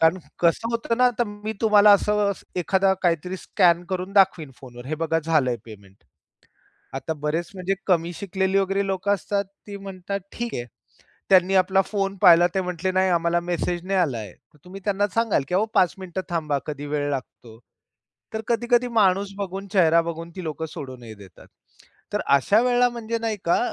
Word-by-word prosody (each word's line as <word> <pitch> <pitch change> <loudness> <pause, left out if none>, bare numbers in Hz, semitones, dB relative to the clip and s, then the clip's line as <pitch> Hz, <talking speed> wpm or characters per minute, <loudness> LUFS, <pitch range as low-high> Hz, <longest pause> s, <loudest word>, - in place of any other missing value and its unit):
कारण 165 +3 +4 0.2
कसं 175 +7 +2
होतं 230 0 -1
ना, 250 0 +6
तर 240 - +3
मी 205 +1 -6
तुम्हाला 210 -2 +6
असं 205 0 +2 0.2
एखादा 190 +2 +2
काहीतरी 180 +1 0
स्कॅन 175 -3 +2
करून 185 +1 -3
दाखवीन 190 -7 +3
फोनवर 120 -1 -11
"हे 155 - -2
बघा 165 0 +1
झालंय 140 -7 +2
पेमेंट." 100 -3 -14 1.0
आता 150 +4 -3
बरेच 165 +3 -1
म्हणजे 190 +1 -1
कमी 175 -2 +1
शिकलेली 190 +1 -1
वगैरे 195 +1 0
लोकं 195 +1 0
असतात 200 +1 -2 0.2
ती 200 - -6
म्हणतात 195 0 -6
"ठीक 235 -1 -4
आहे." 120 - -3 0.7
त्यांनी 190 0 +5
आपला 190 +1 +3
फोन 195 -1 -2
पाहिला 175 0 +7
ते 190 - +1
म्हटले 180 +1 -2
"नाही, 185 0 +2
आम्हाला 170 0 +1
मेसेज 175 0 -2
नाही 195 -1 +1
आला 140 -10 0
आहे." 105 -5 -8 0.3
तुम्ही 190 +2 -10
त्यांना 205 0 +1
सांगाल 230 -9 +2
की - - -2
"अहो 195 +4 +3
5 185 -4 +3
मिनिट 185 -1 -7
थांबा. 155 -4 -1
कधी 145 -1 -5
वेळ 145 0 -2
लागतो." 120 -4 -7 0.8
तर 220 - -1
कधी-कधी 240 +1 +2
माणूस 200 -3 +2
बघून 195 0 -5
चेहरा 170 -4 +5
बघून 165 0 -6
ती 185 - -6
लोकं 160 +1 -4
सोडूनही 125 -5 -9
देतात. 100 -3 -16 0.6
तर - - 0 0.2
अशा 200 - +3
वेळेला 245 0 +3
म्हणजे 230 -1 -4
नाही 225 -2 -2
का, 170 - +3
185 Hz, 175 wpm, -23 LUFS, 165-200 Hz, 1.0 s, पाहिला